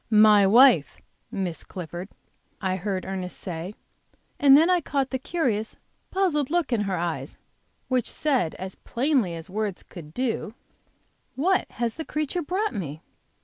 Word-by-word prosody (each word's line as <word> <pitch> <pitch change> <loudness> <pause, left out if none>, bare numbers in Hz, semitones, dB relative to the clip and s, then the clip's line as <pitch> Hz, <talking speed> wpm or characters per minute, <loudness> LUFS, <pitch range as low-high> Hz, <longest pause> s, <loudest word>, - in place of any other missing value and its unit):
"My 210 -2 +6
wife, 230 - +6 0.3
Miss 180 -4 -3
Clifford," 175 +1 -7 0.5
I 190 -2 -1
heard 190 0 -3
Ernest 185 -1 -5
say, 180 +3 -6 0.6
and 280 -1 +8
then 320 +3 +5
I 360 -1 +3
caught 275 -3 -1
the 260 - -1
curious, 245 -8 -1 0.3
puzzled 340 -8 +1
look 330 -6 0
in 225 - +2
her 185 - -1
eyes, 170 0 -3 0.5
which 255 -3 0
said 260 - 0
as 190 0 -7
plainly 245 - 0
as 165 0 -7
words 205 -1 -3
could 160 -5 -11
do: 230 0 -2 0.8
"What 365 +8 +1
has 235 0 -2
the 320 - -3
creature 305 +3 -2
brought 370 +6 -1
me?" 160 -7 -5
220 Hz, 145 wpm, -25 LUFS, 185-285 Hz, 0.8 s, and